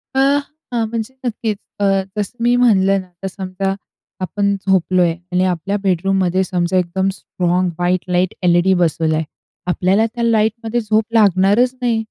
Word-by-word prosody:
अ, 265 - +2 0.5
हां, 230 -2 0
म्हणजे 230 +2 -4
नक्कीच 220 -3 -2 0.2
अ, - - 0 0.3
जसं 210 +4 -3
मी 240 +1 +4
म्हणलं 195 -5 +3
ना, 185 - -15 0.2
तर - - -1
समजा 190 0 -3 0.5
आपण 200 +1 0
झोपलोय 185 -2 +3 0.2
आणि 180 +1 +2
आपल्या 185 +3 -1
बेडरूममध्ये 190 0 +1
समजा 180 0 0
एकदम 185 +2 0
स्ट्राँग 180 0 -1
व्हाईट 180 0 0
लाईट 180 0 +1
एल-ई-डी 175 +2 +4
बसवला 160 -1 +1
आहे, 160 0 -1 0.4
आपल्याला 190 +5 +2
त्या 235 +1 -4
लाईटमध्ये 225 +1 +1
झोप 215 +1 +1
लागणारच 210 +3 +4
नाही, 235 -2 +1
190 Hz, 150 wpm, -18 LUFS, 180-220 Hz, 0.5 s, मी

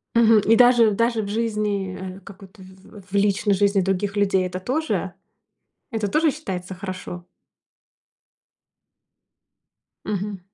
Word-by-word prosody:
Мгм, 225 -2 +6
и 225 +3 +3
даже 240 -3 +5
даже 230 +2 +1
в 200 - -5
жизни, 210 -3 -2 0.2
э, - - -12
как 195 +2 -13
это, 190 +1 -16
в 190 +1 -16
в - - -15
личной 200 0 +2
жизни 200 0 +2
других 195 +2 -1
людей 195 -2 +2
это 180 0 -5
тоже 300 +11 -2 0.8
это 220 -4 -2
тоже 305 +9 +2
считается 190 - -6
хорошо? 185 -2 -7 2.8
Мгм. 205 -1 -3
200 Hz, 125 wpm, -22 LUFS, 190-225 Hz, 2.8 s, Мгм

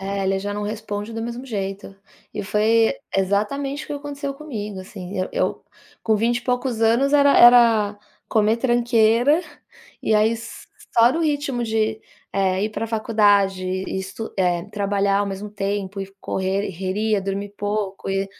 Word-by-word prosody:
É 195 0 -3
ele 195 0 +1
já 205 +1 -4
não 210 - -3
responde 210 0 -4
do 225 0 -4
mesmo 240 +2 -5
jeito. 195 -3 -5 0.4
E 210 - -3
foi 220 +3 +2 0.2
exatamente 215 +9 -1
o - - -17
que - - -4
aconteceu 285 -1 -5
comigo, 210 -10 -6
assim, 185 0 -8
eu 185 - -1
eu - - -1 0.4
com 220 -1 +2
vinte 235 +3 +1
e - - -13
poucos 250 -1 -1
anos 235 +6 +3
era 285 -1 +5
era 230 -4 +6 0.3
comer 220 0 +2
tranqueira 240 +4 +3 0.6
e 220 - +2
aí 215 +2 +3 0.6
só 235 +2 +6
no 330 - -1
ritmo 290 -5 -1
de, 220 -1 0 0.3
eh, 190 0 +1
ir 215 - -2
para 225 - -3
a - - -6
faculdade 205 -4 +2
e 185 +1 -3
estu 200 +4 -6
eh, 175 -2 +1
trabalhar 200 -1 +1
ao 205 - 0
mesmo 200 +1 -5
tempo 200 -1 -3
e 195 0 -6
correria, 195 +2 -1
dormir 200 +1 -4
pouco 205 -2 -3
e, 195 0 0
210 Hz, 165 wpm, -22 LUFS, 195-235 Hz, 0.6 s, era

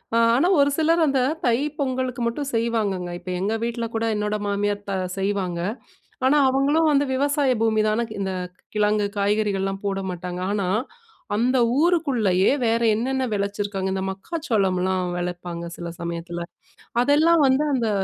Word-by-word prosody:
ஆ - - +4 0.2
ஆனா 290 +8 +3
ஒரு 280 0 +5
சிலர் 325 +1 +3
அந்த 270 -1 +2 0.3
தை 235 -1 +3 0.2
பொங்கலுக்கு 255 -2 -2
மட்டும் 275 +4 -3
செய்வாங்கங்க, 215 -6 0
இப்போ 180 +1 -7
எங்க 210 +3 0
வீட்ல 235 0 -2
கூட, 225 0 0
என்னோட 210 0 -1
மாமியார் 205 0 -1
த - - -1 0.3
செய்வாங்க. 190 -3 -1 0.7
ஆனா 290 +3 +4
அவங்களும் 290 +4 +2
வந்து 285 0 +3
விவசாய 285 0 +2
பூமிதானே! 220 +1 +2
க்கு 220 -2 -8
இந்த 190 -1 -2 0.4
கிழங்கு 210 0 +2
காய்கறிகள்லாம் 200 -1 0
போட 195 -1 -1
மாட்டாங்க 180 0 -5
ஆனா, 200 -3 -1 0.7
அந்த 250 +4 +2 0.2
ஊருக்குள்ளயே, 255 - +2
வேற 230 +1 +2 0.2
என்னென்னா 260 +3 -1
வெளச்சிருக்காங்க 200 -1 -2
இந்த 190 0 -2
மக்காச்சோளம்ல்லாம் 190 - -1
வெளைப்பாங்க 175 -1 -4
சில 170 - -6
சமயத்தில. 170 0 -4 0.6
அதெல்லாம் 310 +5 +4
வந்து, 265 +3 +3
அந்த 235 -4 0
215 Hz, 140 wpm, -23 LUFS, 195-265 Hz, 0.7 s, ஒரு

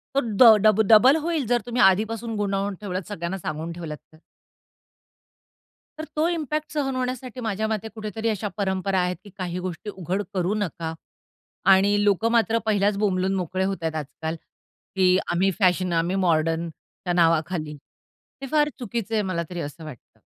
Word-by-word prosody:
तो - - +5
ड 225 -2 +6
डब 215 0 +5
डबल 235 +6 +7
होईल. 320 -3 -1
जर 240 0 +2
तुम्ही 245 0 -1
आधीपासून 220 +4 +2
गुंतवून 200 -1 -1
ठेवलत 185 -3 -4
सगळ्यांना 185 -2 -4
सांगून 160 -1 -5
ठेवलात 165 -3 -6 0.2
तर. - - -17 1.8
तर - - -4
तो 310 +2 +2
इम्पॅक्ट 305 -3 -3
सहन 270 -3 -1
होण्यासाठी 255 -1 -4
माझ्या 220 -1 -1
मते 220 0 -2
कुठेतरी 220 +1 -3
अशा 215 -1 -2
परंपरा 190 -1 0
आहेत, 180 0 0
की 205 - -13
काही 180 -1 -3
गोष्टी 180 +2 -5
उघड 190 +1 -3
करू 185 +1 0
नका 170 -5 -3 0.8
आणि 205 +2 +2
लोकं 205 +3 +2
मात्र 230 -1 +3
पहिल्याच 205 -1 +2
बोंबलून 190 -2 +1
मोकळे 185 0 -2
होत 195 0 -1
आहे 160 -1 -1
आजकाल 160 +2 -5 0.6
की 185 -1 +4
आम्ही 190 +3 +2
फॅशन, 185 -2 +2
आम्ही 170 +3 +1
मॉडर्नच्या 165 0 -1
नावाखाली 165 -2 +1 0.6
हे 270 - -5
फार 300 -1 +3
चुकीचं 230 -2 -4
आहे, 215 - +2
मला 185 -3 -2
तरी 175 - -5
असं 145 +3 -7
वाटतं. 150 -6 -12
195 Hz, 160 wpm, -24 LUFS, 175-225 Hz, 1.8 s, डबल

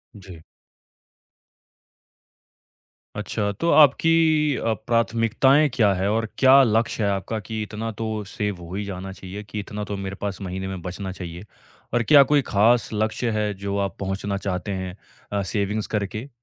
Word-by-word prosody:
जी। 95 -4 -11 2.8
अच्छा, 105 0 -2
तो 135 +12 -2
आपकी 155 0 +4
अ, 115 - 0
प्राथमिकताएँ 115 +5 +3
क्या 110 -5 +3
है, 95 +1 0
और 110 +1 +1
क्या 135 +1 +7
लक्ष्य 115 -1 +1
है 100 - +2
आपका 100 +3 -2
कि 110 +2 -5
इतना 110 +2 -5
तो 110 -1 -4
सेव 105 -1 -3
हो 85 +1 -9
ही 105 - -2
जाना 95 -1 -6
चाहिए, 95 +2 -8
कि 105 +1 -6
इतना 105 +1 -5
तो 105 -1 -4
मेरे 95 0 -5
पास 100 -2 -4
महीने 95 0 -4
में 95 -2 -5
बचना 95 +2 -5
चाहिए 90 0 -8 0.5
और 120 -1 +2
क्या 145 +2 +7
कोई 145 +2 +3
खास 115 +4 +3
लक्ष्य 110 +3 -1
है, 105 -1 0
जो 100 +1 -4
आप 100 -1 -2
पहुँचना 100 +1 -2
चाहते 100 0 -3
हैं 95 -1 -5 0.3
अ, 100 -1 0
सेविंग्स 105 +2 -2
करके? 105 +5 -3
105 Hz, 160 wpm, -23 LUFS, 95-115 Hz, 2.8 s, क्या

